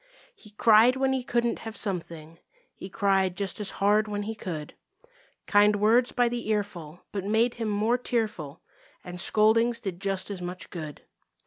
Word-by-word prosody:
He 210 - -15
cried 220 +3 +5
when 265 0 +1
he 260 -1 -1
couldn't 235 -1 0
have 225 -1 -8
something; 165 -5 -5 0.3
He 190 - -9
cried 190 -2 +1
just 200 0 -3
as 210 - 0
hard 210 +2 +3
when 205 -1 -3
he 220 +2 -4
could; 165 -8 -6 0.7
Kind 205 0 +4
words 225 +4 +3
by 245 -1 +2
the 235 -2 -4
earful 180 -6 -3
but 200 -2 -4
made 220 +4 +2
him 220 - -1
more 215 +4 +1
tearful, 210 - -3 0.4
And 180 0 -8
scoldings 230 +4 +3
did 195 -5 -6
just 195 0 -2
as 190 -3 -6
much 180 +1 -6
good. 155 -4 -7
205 Hz, 165 wpm, -27 LUFS, 185-225 Hz, 0.7 s, cried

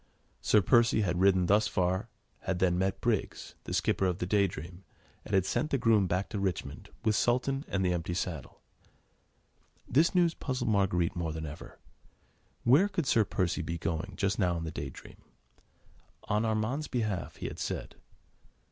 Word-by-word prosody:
Sir 105 -2 +4
Percy 115 0 +4
had 90 -3 0
ridden 95 -2 +4
thus 105 +4 +3
far, 95 -1 0 0.3
had 95 -2 -2
then 90 -1 +2
met 95 +1 -1
Briggs, - - -2
the - - -6
skipper 95 - +1
of 90 -1 -1
the 90 - -2
Day 100 +1 +3
Dream, 85 +2 -9 0.4
and 100 - -2
had 95 -1 +3
sent 155 - -1
the 140 - +1
groom 110 -5 +3
back 90 +3 -1
to 105 - -3
Richmond 85 -7 -3 0.2
with 110 -1 +3
Sultan 135 +5 +1
and 95 -1 -1
the 90 - +2
empty 85 0 -3
saddle. 85 -6 -5 1.3
This 160 +9 +3
news 175 -2 +4
puzzled 130 -7 -2
Marguerite 90 -4 +1
more 85 -2 -2
than 80 0 -5
ever. 75 0 -9 0.9
Where 140 +12 +5
could 190 -6 -2
Sir 115 -3 +4
Percy 90 -2 -1
be 85 +1 -3
going 85 +4 -3
just 100 +1 0
now 90 -3 +2
in 80 - -4
the 80 - -4
Day - - -5
Dream? - - -13 1.1
On 110 +1 0
Armand's 110 +7 -1
behalf, 110 -8 -2
he - - -7
had - - -7
said. - - -4
95 Hz, 175 wpm, -30 LUFS, 90-115 Hz, 1.3 s, Where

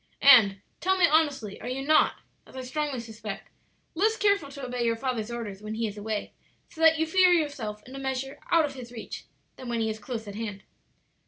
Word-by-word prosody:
"And, 215 -8 +7 0.2
tell 380 +1 +2
me 365 - +6
honestly, 290 -10 +1
are - - -6
you 265 +2 -3
not, 310 +1 +4 0.3
as - - -16
I 260 - -4
strongly 280 0 -2
suspect, 220 -3 -8 0.4
less 435 +6 +2
careful 400 -8 +2
to 280 -1 -7
obey 250 -1 -2
your 230 -1 +2
father's 235 -3 -3
orders 220 -5 -6
when 215 +1 -5
he 230 +1 -1
is 210 -2 -4
away, 210 0 -4 0.4
so 320 - -10
that 320 0 +6
you 320 - +1
feel 365 +2 +5
yourself 270 -11 -1
in 260 - -11
a - - -5
measure 270 0 -3
out 330 -2 +5
of 285 - -5
his 250 -3 -9
reach, 235 -2 -8 0.3
than 255 - -8
when 235 -1 -1
he 220 -1 0
is 215 - -7
close 225 0 -6
at 200 - -6
hand?" 205 -2 -5
255 Hz, 220 wpm, -27 LUFS, 220-300 Hz, 0.4 s, And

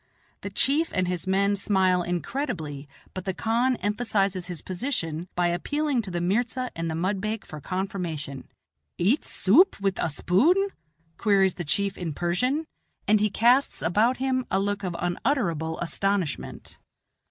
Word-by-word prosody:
The - - -5
chief 300 +5 +2
and 185 -1 +1
his 180 -1 -3
men 200 +1 +2
smile 190 -2 +2
incredibly, 175 - -3 0.2
but 185 - -6
the 190 -2 -2
khan 240 +5 +1
emphasizes 200 -4 0
his 175 -5 -6
position 175 - -2
by 175 0 +2
appealing 285 - 0
to 200 - -7
the 175 -1 -2
mirza 240 +8 0
and 165 0 -2
the 160 - -2
mudbake 200 +5 -2
for 155 -1 -9
confirmation. 175 -7 -4 0.5
"Eat 215 - +2
soup 295 - +4
with 195 -1 -1
a 170 - +1
spoon?" 315 - +3 0.5
queries 195 -4 +3
the 175 - -5
chief 200 +6 -1
in 165 -5 -4
Persian; 250 - 0 0.4
and 215 0 +5
he 210 +1 +2
casts 245 +6 +3
about 215 +10 +3
him 260 -1 0
a 190 - +1
look 205 +1 -1
of 180 -2 -3
unutterable 175 - -1
astonishment. 185 -2 -2
195 Hz, 150 wpm, -26 LUFS, 175-235 Hz, 0.5 s, and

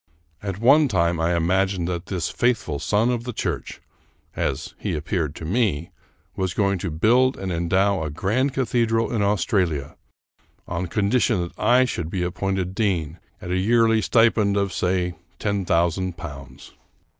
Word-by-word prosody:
At 100 -2 -4
one 140 +6 +5
time 85 -6 +1
I 85 +2 +1
imagined 95 +1 +1
that 90 0 -4
this 90 -4 -2
faithful 115 - 0
son 110 - +1
of 120 -1 -2
the 125 - -4
church - - -4 0.3
— - - -37 0.2
as - - -2
he - - -2
ap 75 - -7
peared 80 -7 -1
to 80 - -7
me 90 -4 0 0.2
— - - -40
was 95 -1 -2
going 100 -2 +1
to 95 - -3
build 120 - +3
and 95 -1 -4
endow 95 +3 +1
a 80 - -2
grand 105 - 0
cathedral 115 -3 +1
in 110 - 0
Australia 90 -7 0 0.7
on 85 +1 -3
condition 105 +3 +1
that 85 - -7
I 125 +4 +4
should 85 -9 -3
be 90 -1 -2
ap 90 - -3
pointed 95 -2 -2
dean 90 -7 -1 0.2
at 90 - -5
a 90 - +1
yearly 115 +2 +3
stipend 110 -3 +3
of, 100 -2 0
say, 90 -1 0 0.2
ten 100 -2 -1
thousand 85 +1 0
pounds. 70 -4 -10
95 Hz, 170 wpm, -23 LUFS, 85-110 Hz, 0.7 s, one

